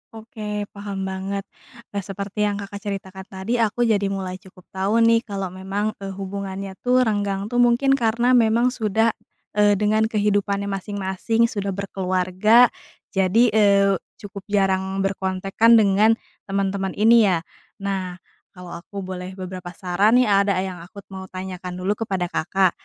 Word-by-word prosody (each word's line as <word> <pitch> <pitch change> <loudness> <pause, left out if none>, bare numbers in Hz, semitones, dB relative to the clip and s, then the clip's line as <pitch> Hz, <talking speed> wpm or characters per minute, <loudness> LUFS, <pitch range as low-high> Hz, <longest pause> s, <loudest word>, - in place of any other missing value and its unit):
Oke, 215 -2 -5
paham 200 -1 -5
banget. 190 +1 -3 0.5
Nah, 200 - -2
seperti 200 +2 -3
yang 205 - -1
Kakak 200 0 -7
ceritakan 190 -2 -6
tadi, 195 +6 -3
aku 230 +1 +1
jadi 210 -4 +2
mulai 190 -1 -4
cukup 185 -1 -17
tahu 200 +5 +1
nih, 230 0 +5
kalau 195 -3 -4
memang, 195 +3 -2
eee, 195 -1 -6
hubungannya 195 0 -6
tuh 250 +1 +3
renggang 205 -2 -1
tuh 245 - +1
mungkin 245 +3 +4
karena 240 -1 +2
memang 235 +1 +4
sudah, 225 -1 +1 0.4
eee, 205 0 +4
dengan 215 +2 +2
kehidupannya 205 -2 0
masing-masing, 200 +4 -1
sudah 200 -2 -3
berkeluarga, 190 +4 +3 0.4
jadi, 190 +4 +3
eee, 200 -2 +4 0.2
cukup 200 -1 -10
jarang 195 -1 0
berkontakan 195 +4 +2
dengan 215 +1 +4 0.3
teman-teman 195 -1 -1
ini, 225 0 +5
ya. 175 -3 +1 0.4
Nah, 190 -2 -3 0.4
kalau 180 -1 -9
aku 195 +2 -8
boleh 185 0 -6
beberapa 185 -2 -7
saran 195 +5 +2
nih, 250 0 +5
ada 200 -1 +3
yang 185 -2 -6
aku 190 +4 -12
mau 190 0 -7
tanyakan 185 -1 -7
dulu 210 +3 -1
kepada 180 -3 -2
Kakak. 190 +2 +1
200 Hz, 145 wpm, -22 LUFS, 190-215 Hz, 0.5 s, nih